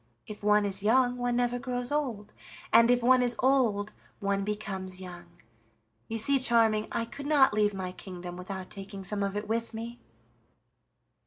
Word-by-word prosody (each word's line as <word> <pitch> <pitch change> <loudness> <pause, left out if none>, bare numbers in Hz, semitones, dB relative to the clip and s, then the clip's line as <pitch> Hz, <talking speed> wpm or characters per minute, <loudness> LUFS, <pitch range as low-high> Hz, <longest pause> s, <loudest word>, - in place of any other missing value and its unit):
If 210 -1 -10
one 210 0 +4
is 195 -1 -2
young 245 +4 +3
one 245 0 -1
never 245 0 0
grows 245 0 -3
old, 245 -9 -2 0.4
and 230 +1 +7
if 245 -1 +3
one 255 +1 +5
is 245 -1 +2
old 235 -6 +2 0.3
one 200 -1 0
becomes 195 -3 -5
young. 175 -2 -9 0.8
You 225 - -3
see, 270 +5 +4
Charming, 225 -4 +3
I 230 - -1
could 280 +5 -8
not 285 -6 +5
leave 210 -1 +2
my 185 -1 -4
kingdom 180 -1 -8
without 185 +1 -7
taking 195 0 -7
some 200 +2 -1
of 200 0 -1
it 210 0 -4
with 230 +1 -2
me." 235 +2 -6
215 Hz, 170 wpm, -29 LUFS, 200-245 Hz, 0.8 s, and